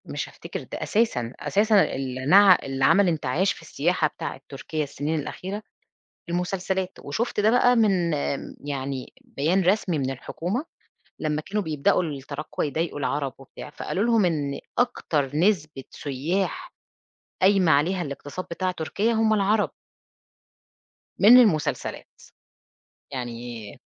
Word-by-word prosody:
مش - - -4
هافتكر - - -7
ده - - -6
أساسًا، 130 - 0
أساسًا 205 +7 +3
النع 135 +9 +5
اللي 135 0 0
عمل 200 +5 +5
انتعاش 160 +3 +1
في - - -14
السياحة - - 0
بتاعة - - -7
تركيا 155 -1 -4
السنين 150 +2 -2
الأخيرة 190 +7 -5 0.7
المسلسلات، 185 +1 -1
وشُفت 215 +11 -2
ده 210 +1 +4
بقى 245 0 +4
من 190 -7 +2
امم، 145 -1 -3
يعني 135 -2 -4
بيان 165 +7 0
رسمي 185 -2 +2
من 135 -1 -1
الحكومة 175 - -4 0.5
لمّا 155 0 -1
كانوا 205 +6 -2
بيبدأوا 155 +2 +1
التراكوة 145 -1 -4
يضايقوا 155 +1 -2
العرب 140 -1 -1
وبتاع، 135 +2 -11
فقالوا 185 +6 -3
لهم 230 -4 +3
إن 145 -5 -1 0.2
أكتر 150 - 0
نسبة 155 -6 +1
سُيّاح 185 - -3 0.7
قايمة 190 -3 +5
عليها 175 +6 +2
الاقتصاد 145 +3 -6
بتاع 185 +2 -1
تركيا 190 +6 -1
همّ 220 -1 +2
العرب. 210 +1 +2 1.5
من 225 +5 +9
المسلسلات، 205 -12 +1 0.9
يعني 120 -4 -6
165 Hz, 125 wpm, -25 LUFS, 140-200 Hz, 1.5 s, من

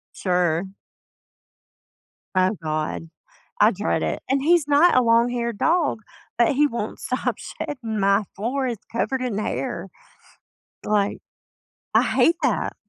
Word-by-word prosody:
Sure. 180 0 0 1.6
Oh 185 +3 +3
god. 155 +1 -3 0.5
I - - +7
dread - - -1
it. - - -2
And 270 +1 +1
he's 330 0 +3
not 290 +2 +5
a 255 - +5
long-haired 235 -1 +1
dog, 320 -8 +1 0.4
but 235 - +5
he 295 +2 +4
won't 235 -5 -4
stop 255 - -2
shedding, 225 -7 -5
my 200 +1 +3
floor 255 +7 -2
is 235 -3 -3
covered 255 +2 -1
in 235 -5 -2
hair, 215 - -3 1.0
like 205 -1 +1 0.8
I - - +6
hate 335 +1 +3
that. - - 0
235 Hz, 125 wpm, -23 LUFS, 200-270 Hz, 1.6 s, I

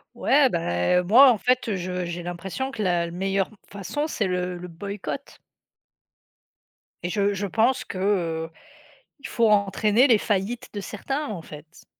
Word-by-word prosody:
Ouais, 280 -1 +4
beh, 165 - 0
heu, - - -1
moi, 250 +8 +7
en 215 - 0
fait, 250 -4 +1
je 180 0 -3
j'ai 175 0 -5
l'impression 175 +9 -4
que 225 -6 -4
la 175 -2 +1
meilleure 195 +2 -1 0.2
façon, 205 +10 -4
c'est 225 -10 -1
le 180 -1 -2
le 180 - -7
boycott 200 +9 -7 1.7
et 175 - -2
je 200 +1 +1
je 200 +1 -3
pense 230 +6 +1
que, - - -7
heu, 165 -5 0 0.7
il - - -7
faut 230 -1 +2
entraîner 210 +4 +3
les 235 -5 +5
faillites 210 +3 -2
de 205 - -3
certains, 270 +9 -4
en 200 -5 -5
fait. 155 +2 -13
195 Hz, 160 wpm, -24 LUFS, 175-225 Hz, 1.7 s, moi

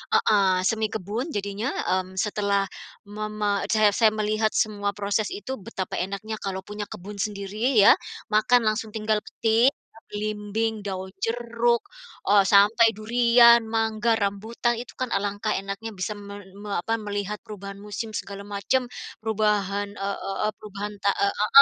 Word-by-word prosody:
heeh, 190 -3 +3
semi 220 +2 +1
kebun 220 - -4
jadinya, 205 +3 -2 0.2
mmm, 185 0 -1
setelah 200 0 +1 0.4
mama 210 -1 -2
eee, - - -30
saya 215 -1 +6
saya 220 +1 +4
melihat 215 0 0
semua 205 -2 0
proses 205 +1 0
itu 265 - -5
betapa 190 -2 -4
enaknya 200 +4 -4
kalau 190 -1 -4
punya 210 0 -6
kebun 200 +3 -9
sendiri 210 +5 -1
ya, 205 -2 +8 0.4
makan 220 +3 +4
langsung 215 0 0
tinggal 215 0 +1
petik, 230 +5 +2 0.4
belimbing, 210 +1 -2
daun 190 -1 -4 0.2
jeruk, 235 0 +1 0.5
eee, 200 0 +6
sampai 205 +4 +5
durian, 235 +2 +5
mangga, 225 0 0
rambutan 220 +4 -1
itu 235 +1 -7
kan 255 - 0
alangkah 205 +2 -1
enaknya 195 +3 -4
bisa 185 +3 -3
me 200 0 -9
me 205 +1 -9
apa 225 +6 -1
melihat 205 0 -3
perubahan 200 -1 -9
musim 210 +2 -5
segala 200 -1 -6
macam 205 +5 0 0.4
perubahan 205 -2 +1
eee 195 0 -2
eee 195 - -4
eee, 215 - +1
perubahan 210 0 -6
te 200 - +2
ah 200 0 +2
ah 210 - -1
210 Hz, 150 wpm, -25 LUFS, 200-220 Hz, 0.5 s, ya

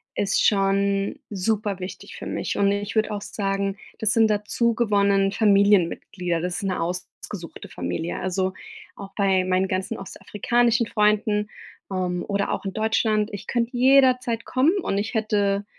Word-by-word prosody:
ist 200 - +1
schon 200 +4 +1
super 205 0 -1
wichtig 185 +1 -8
für - - -8
mich. - - -3
Und 200 0 +3
ich 205 +1 -3
würde 220 0 +1
auch 205 -1 -3
sagen, 195 -1 -2 0.2
das 220 -1 +2
sind 225 -1 +5
dazu 210 +3 +1
gewonnen 200 -3 +2
Familienmitglieder, 195 -4 +2
das 180 0 -2
ist 205 - -4
'ne 185 -3 -1
ausgesuchte 175 0 -6
Familie. 90 - -4
Also, 185 0 -1 0.4
auch 200 -1 -9
bei 190 -2 +2
meinen 185 +1 +1
ganzen 185 0 -2
ostafrikanischen 235 +4 0
Freunden, 210 0 +1 0.4
ähm, 180 -1 -2
oder 200 0 -1
auch - - -3
in 195 - -3
Deutschland, 220 -1 +1
ich 200 - -7
könnte 240 +1 -1
jederzeit 255 -3 +4
kommen 275 +7 +2
und 200 - -1
ich 215 +4 -2
hätte 205 -2 0
200 Hz, 150 wpm, -24 LUFS, 190-220 Hz, 0.4 s, sind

